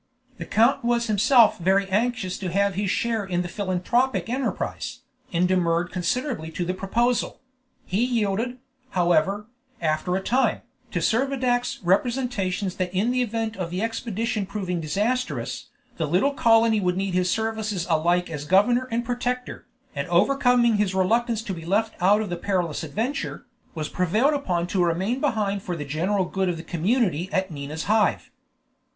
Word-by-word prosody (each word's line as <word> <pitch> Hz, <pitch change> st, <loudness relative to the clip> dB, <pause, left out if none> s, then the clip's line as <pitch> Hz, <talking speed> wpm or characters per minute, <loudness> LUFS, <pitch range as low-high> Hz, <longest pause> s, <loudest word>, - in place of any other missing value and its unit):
The -, -, -6 dB
count 235 Hz, +5 st, +3 dB
was 235 Hz, 0 st, +1 dB
himself 220 Hz, +2 st, +4 dB
very 190 Hz, +3 st, +2 dB
anxious 220 Hz, -2 st, 0 dB
to 185 Hz, -3 st, -3 dB
have 200 Hz, +2 st, +2 dB
his 195 Hz, +1 st, -1 dB
share 225 Hz, +1 st, 0 dB
in 180 Hz, -2 st, -1 dB
the -, -, -4 dB
philanthropic 205 Hz, +8 st, 0 dB
enterprise, 260 Hz, +1 st, -3 dB, 0.3 s
and 175 Hz, +1 st, +2 dB
demurred 175 Hz, -1 st, +1 dB
considerably 185 Hz, -, -2 dB
to 175 Hz, -, -2 dB
the 180 Hz, -, -1 dB
proposal; 235 Hz, +6 st, 0 dB, 0.5 s
he 195 Hz, +6 st, 0 dB
yielded, 235 Hz, 0 st, 0 dB, 0.4 s
however, 175 Hz, +4 st, +2 dB, 0.3 s
after 160 Hz, +2 st, 0 dB
a -, -, +1 dB
time, 260 Hz, +6 st, +1 dB, 0.3 s
to -, -, -2 dB
Servadac's 245 Hz, 0 st, 0 dB
representations 200 Hz, -2 st, 0 dB
that 180 Hz, -1 st, -1 dB
in 200 Hz, +6 st, +1 dB
the 255 Hz, 0 st, +1 dB
event 225 Hz, -1 st, -2 dB
of 180 Hz, -3 st, -3 dB
the 180 Hz, +4 st, -2 dB
expedition 225 Hz, -2 st, -2 dB
proving 185 Hz, -4 st, -3 dB
disastrous, 220 Hz, -, -2 dB, 0.3 s
the 160 Hz, -, -1 dB
little 190 Hz, -, +2 dB
colony 225 Hz, -3 st, +4 dB
would 180 Hz, -1 st, 0 dB
need 195 Hz, -1 st, -1 dB
his 180 Hz, 0 st, +1 dB
services 220 Hz, -4 st, -1 dB
alike 175 Hz, +2 st, +2 dB
as 150 Hz, -3 st, -5 dB
governor 240 Hz, +9 st, +3 dB
and 235 Hz, +1 st, -1 dB
protector, 250 Hz, +1 st, -3 dB, 0.3 s
and 140 Hz, 0 st, -3 dB
overcoming 240 Hz, +4 st, +3 dB
his 200 Hz, -2 st, 0 dB
reluctance 225 Hz, +4 st, +1 dB
to 200 Hz, -, -4 dB
be 165 Hz, -2 st, -7 dB
left 215 Hz, +6 st, 0 dB
out 205 Hz, +4 st, +4 dB
of 210 Hz, -4 st, -4 dB
the 175 Hz, -, -2 dB
perilous 175 Hz, -4 st, -1 dB
adventure, 225 Hz, -, -3 dB, 0.3 s
was 155 Hz, -2 st, -3 dB
prevailed 215 Hz, -, +1 dB
upon 180 Hz, -12 st, -1 dB
to 180 Hz, 0 st, 0 dB
remain 185 Hz, +9 st, 0 dB
behind 210 Hz, -8 st, 0 dB
for 180 Hz, -2 st, -4 dB
the 150 Hz, -3 st, -5 dB
general 180 Hz, +7 st, 0 dB
good 190 Hz, +1 st, -1 dB
of 175 Hz, -, -2 dB
the 165 Hz, -, -8 dB
community 180 Hz, -, 0 dB
at 190 Hz, -1 st, 0 dB
Nina's 150 Hz, +2 st, -5 dB
Hive. 215 Hz, +1 st, +1 dB
200 Hz, 160 wpm, -24 LUFS, 180-235 Hz, 0.5 s, himself